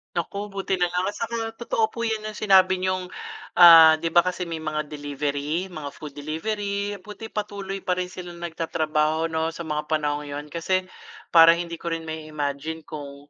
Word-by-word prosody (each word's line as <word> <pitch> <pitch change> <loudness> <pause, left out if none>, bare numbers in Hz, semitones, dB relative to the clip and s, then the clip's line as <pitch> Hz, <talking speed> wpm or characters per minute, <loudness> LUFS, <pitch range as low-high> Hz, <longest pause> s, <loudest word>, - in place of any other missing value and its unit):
Naku 205 +1 -3
buti 195 -1 -3
nalang 180 +1 +1
at 205 - -2
saka 230 0 -2 0.2
totoo 225 -1 0
po 230 - -5
yun 220 -2 -1
yung 215 - -5
sinabi 185 -2 +4
niyong, 185 0 -1 0.5
ah, 165 -2 +10
di 165 - 0
ba, 175 +2 +4
kasi 180 0 -2
may 165 - -3
mga 155 -1 -3
delivery, 145 +4 -3
mga 155 -5 -6
food 150 -2 -10
delivery, 200 +6 -3
buti 210 +3 -10
patuloy 200 -2 -4
pa 185 -1 -1
rin 180 0 -3
silang 175 -2 -9
nag-tatrabaho 160 -1 0
'no 160 0 -1
sa - - -7
mga 150 -2 -3
panahong 150 -1 -1
yun. 145 +1 -6
Kasi, 185 +4 0 0.5
para 165 0 +8
hindi 170 0 -4
ko 170 0 -4
rin 165 -1 -5
mai-imagine 155 0 -4
kung, 145 -1 -9
165 Hz, 175 wpm, -24 LUFS, 155-190 Hz, 0.5 s, ah